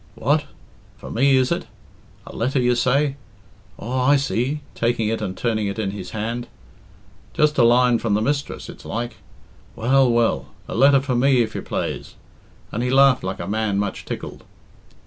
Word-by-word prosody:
"What? 145 +5 +1 0.5
For - - -10
me, 135 +4 +3
is 130 -1 +2
it? - - -2 0.6
A - - -11
letter, 130 +4 0
you 125 0 +3
say? 135 +3 +1 0.6
Aw, 125 +3 -2
I 145 - +6
see," 135 +1 -1
taking 115 -2 0
it 110 0 -2
and 95 -3 -4
turning 110 -3 -1
it 100 - -4
in 105 -3 -2
his 100 -2 -7
hand, 115 +3 -4 0.9
"just'a 150 -3 +3
line 120 0 +4
from 110 -3 0
the - - +2
mistress, 145 +2 -2
it's - - -11
like. 120 +1 -4 0.6
Well, 130 +3 +3
well! 115 - +1 0.2
A - - -6
letter 140 +2 +5
for 135 -2 -2
me, 125 0 +4
if 110 -1 -6
you - - -4
plaze," - - -4 0.6
and 115 - -3
he 125 - 0
laughed 135 0 +5
like 95 +1 -4
a - - -4
man 105 -1 -1
much 100 -1 -3
tickled. - - -7
120 Hz, 175 wpm, -22 LUFS, 110-135 Hz, 0.9 s, I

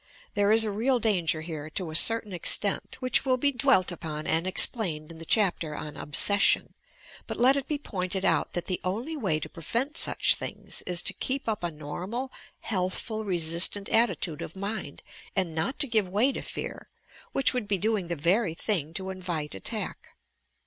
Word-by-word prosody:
There 205 0 +2
is 225 0 +6
a 215 - -1
real 245 +6 +2
danger 180 -8 +1
here, 155 -2 -6
to 165 0 -4
a - - -6
certain 225 +3 +4
extent, 195 +3 -1
which 255 -1 +2
will 260 -2 +2
be 280 +3 +2
dwelt 255 -9 +3
upon 155 -3 -5
and 165 +3 +1
explained 170 -6 +3
in 165 - -11
the 165 - -8
chapter 175 -6 +1
on 150 0 -6
"Obsession." 200 +8 +3 0.5
But - - -4
let 255 +3 +6
it 280 -1 -2
be 300 - -1
pointed 190 -7 -3
out - - +2
that 175 - -2
the 185 - -3
only 230 +13 -3
way 190 - 0
to - - -5
prevent 235 - -3
such - - +2
things, - - -4
is 175 -1 +1
to - - 0
keep 270 0 -3
up 215 -5 -2
a 175 - 0
normal, 180 - -5 0.3
healthful 210 +2 -2
resistant 175 +2 0
attitude 190 -9 +2
of 165 - -7
mind 200 +3 -5 0.3
and 185 -4 0
not 160 - -2
to 285 - +3
give 220 -5 +2
way 215 +9 +2
to - - -5
fear, - - -6 0.4
which 270 - +3
would 245 -5 -2
be 200 -1 +1
doing 210 -1 0
the 170 - -2
very 170 +4 +1
thing 165 -6 -1
to 190 +1 -4
invite 175 -5 -4
attack. 95 - -5
190 Hz, 185 wpm, -27 LUFS, 165-225 Hz, 0.5 s, is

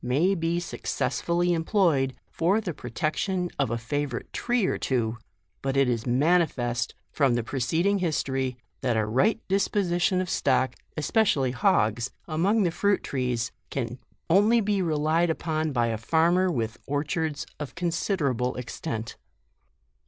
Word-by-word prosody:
may 145 +10 +2
be 170 -1 0
success 175 - -2
fully 175 +1 +1
employed 165 -6 +2 0.2
for 185 +6 +2
the 195 -6 -4
protection 180 +5 -2
of 140 - +2
a 115 - -1
favour 130 +2 -2
ite - - -24
tree 240 -4 +1
or - - +1
two, 115 -4 -1 0.5
but 135 0 -1
it 135 -1 +4
is 120 -1 -1
manifest, 125 -4 +1 0.2
from 135 -5 +2
the 120 - 0
preceding 160 - 0
history, 135 -7 -1 0.2
that 125 -4 +1
a 110 - +2
right 130 - +2
disposition 185 -2 +1
of 185 - -1
stock, 130 -6 +1 0.2
especially 155 - +2
hogs, 120 - +2 0.2
among 190 +7 +2
the 175 - +1
fruit 200 +3 +1
trees, 125 -3 -1 0.2
can 125 -1 -3 0.3
only 205 +7 +5
be 205 -2 +1
relied 160 +1 +1
upon 160 -1 -1
by 120 -3 +1
a 115 -2 -2
farmer 170 +8 +3
with 115 -8 -2
orchards 145 +2 -1
of 150 -2 -6
considerable 165 - 0
extent. 120 -2 -5
155 Hz, 145 wpm, -26 LUFS, 125-180 Hz, 0.5 s, only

